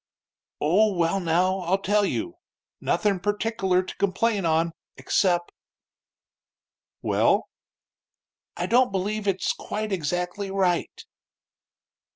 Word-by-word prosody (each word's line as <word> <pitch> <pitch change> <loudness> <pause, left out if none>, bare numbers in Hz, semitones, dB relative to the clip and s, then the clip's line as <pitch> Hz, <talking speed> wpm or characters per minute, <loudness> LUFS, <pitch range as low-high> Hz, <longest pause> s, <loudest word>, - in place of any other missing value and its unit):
"Oh, 195 +6 +3
well, 170 +2 +1
now, 180 +2 +1
I'll 185 +1 +1
tell 205 +1 +2
you. 345 - -3 0.4
Nothin' 205 -3 +1
pertickler 205 -2 0
to 185 - -8
complain 200 0 +1
on, 165 +1 +2 0.3
excep' 175 -3 +1 0.8
" - - -69
"Well?" - - +2 1.1
"I - - -1
don't 250 -1 +3
believe 205 +2 -2
it's 190 -1 +1
quite 215 0 -4
exactly 180 +3 -2
right." 190 -3 -1
190 Hz, 105 wpm, -25 LUFS, 180-205 Hz, 1.1 s, Oh